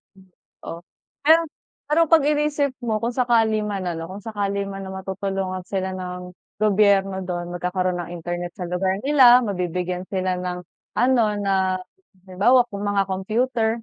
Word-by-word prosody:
Hmm. 190 0 -20 0.4
Oh, 165 +1 -6 0.5
ayun. 325 +2 +6 0.4
Pero 325 +2 +3
'pag 320 -2 +5
inisip 295 -1 +1
mo 225 -3 -1
kung 235 - 0
sakali 230 -4 +3
man 200 -2 -3
ano, 165 -1 -4
kung 190 +3 -9
sakali 200 -2 -2
man 195 0 -6
na - - -7
matutulungan 190 -1 -3
sila 190 -1 -2
ng 180 -1 -6 0.3
gobyerno 200 -2 +3
dun, 175 -1 -4
magkakaroon 180 +1 -1
ng 175 0 -6
internet 175 +1 -5
sa 180 -3 -5
lugar 185 +2 0
nila, 255 -4 +7
mabibigyan 180 -2 -2
sila 185 -1 -1
ng 180 0 -4 0.3
ano, 245 -1 +3 0.2
na 190 -2 +1 0.5
halimbawa 210 +8 +4
mga 200 0 0
computer 220 +5 0
195 Hz, 150 wpm, -23 LUFS, 180-225 Hz, 0.5 s, nila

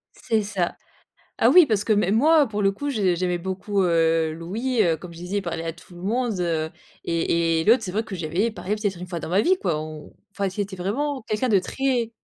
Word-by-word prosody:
C'est 220 -2 0
ça. 195 -4 -2 0.6
Ah - - +5
oui, 355 -4 +8
parce 215 -4 0
que 220 - +2
même 205 -1 +2
moi, 310 +3 +5
heu, - - -7
pour 210 -1 -2
le 195 0 +3
coup, 285 +8 -5
je 195 -8 +1
j'aimais 180 0 -1
beaucoup 190 +2 -2
heu, 165 -2 +2
Louis, 215 +9 -1
heu, 165 -3 +2
comme 170 +2 -10
je 165 - -12
disais, 180 +4 -3
il - - -3
parlait 165 -2 -4
à 165 - -3
tout 175 +1 -17
le 175 - -11
monde, 230 0 -1
heu, 160 -2 -1 0.3
et 165 0 +1
et - - -2
l'autre 230 +1 +5
c'est 180 - -5
vrai 220 +3 0
que 195 - -7
j'avais 175 +7 -1
parlé 210 -1 -3
peut-être 205 -4 -2
1 180 - -7
fois 170 -2 -5
dans - - -6
ma 190 +4 +3
vie 375 +1 +3
quoi. 170 -5 0
On 155 -1 -9 0.2
enfin, 200 -1 -1
c'était 195 0 -4
vraiment 260 +9 -2
quelqu'un 215 +4 0
de 200 - +5
très 245 +2 -1
195 Hz, 245 wpm, -24 LUFS, 170-220 Hz, 0.6 s, oui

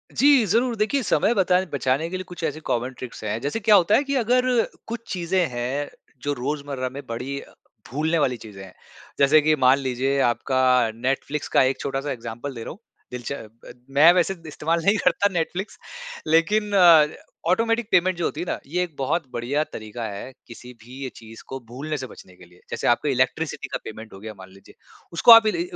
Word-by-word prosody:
जी, 275 -3 +5
ज़रूर। 235 +5 +1
देखिए, 220 +6 0
समय 225 - +2
बता 185 -3 +3
बचाने 140 +4 0
के 185 - -4
लिए 185 - -5
कुछ 175 -2 -9
ऐसे 155 0 -2
कॉमन 125 +2 -1
ट्रिक्स 125 -3 -9
हैं। 110 +1 -2
जैसे 145 - -2
क्या 210 0 +5
होता 195 +2 +4
है 280 - +3
कि 280 0 -2
अगर 250 +1 +2 0.4
कुछ 230 0 -4
चीज़ें 180 0 0
हैं, 125 +4 -3 0.3
जो 145 0 -1
रोज़मर्रा 140 -1 -3
में 140 +2 -9
बड़ी 125 +4 -4 0.5
भूलने 155 +5 0
वाली 125 -4 +1
चीज़ें 105 -3 -11
हैं। 95 -1 -13 0.5
जैसे 145 +2 +6
कि 155 +1 +3
मान 130 0 +4
लीजिए, 135 +1 -1
आपका 125 -1 +2
नेटफ्लिक्स 135 +4 -2
का - - +4
एक 130 +1 0
छोटा-सा 140 +1 -3
ऐग्ज़ाम्पल 120 +2 -6
दे 115 - -6
रहा - - -7
हूँ 195 - -12 0.3
दिलच 125 +1 -6
ब 115 -1 -11 0.2
मैं 160 +4 +8
वैसे 180 +1 +2
इस्तेमाल 160 +2 -1
नहीं 200 +2 +4
करता 180 +3 +3
नेटफ्लिक्स। 175 +4 -3 0.5
लेकिन 205 +7 +2
अ, 170 -5 +7 0.4
ऑटोमेटिक 230 +3 +1
पेमेंट 185 0 +3
जो 170 - -1
होती 155 - -3
है 175 - -3
ना, - - -2
ये 180 +4 0
एक 165 -5 -8
बहुत 140 +2 -1
बढ़िया 125 +6 -1
तरीका 110 +2 -7
है, 100 +6 -7 0.2
किसी 125 +1 -11
भी 130 +3 -8
चीज़ 115 0 -13
को 135 - -6
भूलने 145 +6 -5
से 130 -2 -6
बचने 90 - -15
के 90 -1 -16
लिए। 90 +1 -22
जैसे - - -3
आपका 120 +5 +2
इलेक्ट्रिसिटी 135 +5 -1
का - - -3
पेमेंट 110 0 -9
हो 95 - -11
गया, 110 +1 -8
मान 95 0 -12
लीजिए। 95 +1 -18 0.4
उसको 170 +8 +6
आप 225 -1 +9
इ 215 - +3
ली 345 - -2
अ 360 - -10
145 Hz, 205 wpm, -23 LUFS, 125-180 Hz, 0.5 s, आप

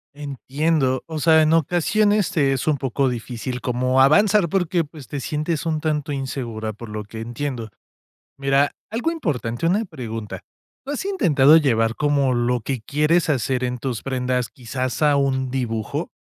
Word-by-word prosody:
Entiendo, 140 -1 -1
o 160 -1 -4
sea, 160 0 +5
en 155 +1 +3
ocasiones 195 +5 +2
es 135 -2 +1
un 150 -2 +3
poco 135 +1 0
difícil 125 +1 -5
como 125 +1 +1
avanzar 200 +5 +4
porque 175 -2 +1
pues 150 -4 -12
te 145 - -4
sientes 155 +3 -2
un 155 -1 0
tanto 150 -1 -1
insegura, 120 -6 -4
por 110 +2 -10
lo 105 0 -5
que 110 +2 -9
entiendo. 120 0 -4 0.7
Mira, 140 +1 +2 0.2
algo 240 +9 -1
importante, 145 - -2
una 205 +6 +2
pregunta, 115 - -6 0.4
¿lo 275 - -4
has 295 - -4
intentado 160 - +5
llevar 115 -7 +2
como 145 -3 +2
lo 120 0 +1
que 125 +1 -4
quieres 150 +6 +1
hacer 130 -2 0
en 125 0 -1
tus 120 -4 -4
prendas, 125 -2 -1
quizás 130 +2 -4
a 150 -2 +4
un 130 -2 +1
dibujo? 115 -4 -3
135 Hz, 160 wpm, -22 LUFS, 125-155 Hz, 0.7 s, sea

